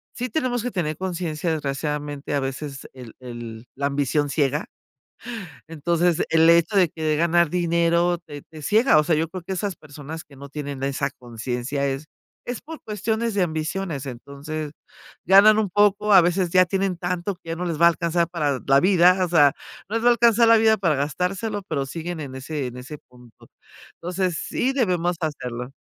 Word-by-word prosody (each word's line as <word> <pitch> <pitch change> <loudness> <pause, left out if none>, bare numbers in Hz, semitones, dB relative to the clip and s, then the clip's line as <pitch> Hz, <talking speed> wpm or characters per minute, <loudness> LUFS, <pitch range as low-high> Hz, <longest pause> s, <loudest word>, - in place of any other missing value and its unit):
sí 250 +2 -3
tenemos 245 -2 -1
que 250 - -1
tener 155 -5 -2
conciencia 175 -3 -3
desgraciadamente 145 -1 -3
a 140 - 0
veces 135 +1 -5
el 125 -4 -12
el 120 -2 -8
la 140 +1 -1
ambición 145 +1 0
ciega. 145 +1 0 1.0
Entonces, 170 +2 +1
el 165 0 +5
hecho 170 +4 +4
de 180 -3 +5
que 160 +1 -8
de 155 -1 +1
ganar 170 0 +3
dinero 170 0 +1
te 145 -4 -11
te 155 -1 -13
ciega, 220 - +4
o 150 - +3
sea, 160 -1 +2
yo 160 +2 0
creo 185 -1 -7
que 190 - -4
esas 195 0 -3
personas 155 +2 -9
que 140 - -17
no 140 - -9
tienen 140 -2 -6
esa 140 0 -1
conciencia 125 +3 -4
es 135 +2 -3 0.4
es 245 -1 -5
por 315 +4 -10
cuestiones 220 +2 -2
de 200 -2 +2
ambiciones, 160 -2 -3
entonces 140 +4 -6 0.5
ganan 200 +4 +7
un 210 - 0
poco, 205 +2 +3
a 190 - +9
veces 175 +1 +1
ya 185 0 +6
tienen 190 0 -1
tanto, 180 +2 -3
que 165 -1 -14
ya 165 - -2
no 180 - -3
les 165 -3 -2
va - - +8
a - - +8
alcanzar 170 0 0
para 145 -6 -1
la 135 0 +6
vida, 180 0 +5
o 175 - -6
sea, 145 -5 +5 0.4
no 220 - -3
les 230 - -3
va 245 - +7
a - - +7
alcanzar 235 0 +4
la 230 - +7
vida 220 0 +4
para 170 -7 +1
gastárselo, 180 - -2
pero 140 -4 -1
siguen 165 +3 -5
en 130 -3 -7
ese 140 +1 -4
en 125 0 -8
ese 140 +4 -8
punto. 125 -3 -19 0.5
Entonces, 180 0 -2
sí 260 - -1
debemos 180 -8 0
hacerlo. 125 -5 -4
165 Hz, 195 wpm, -23 LUFS, 140-185 Hz, 1.0 s, a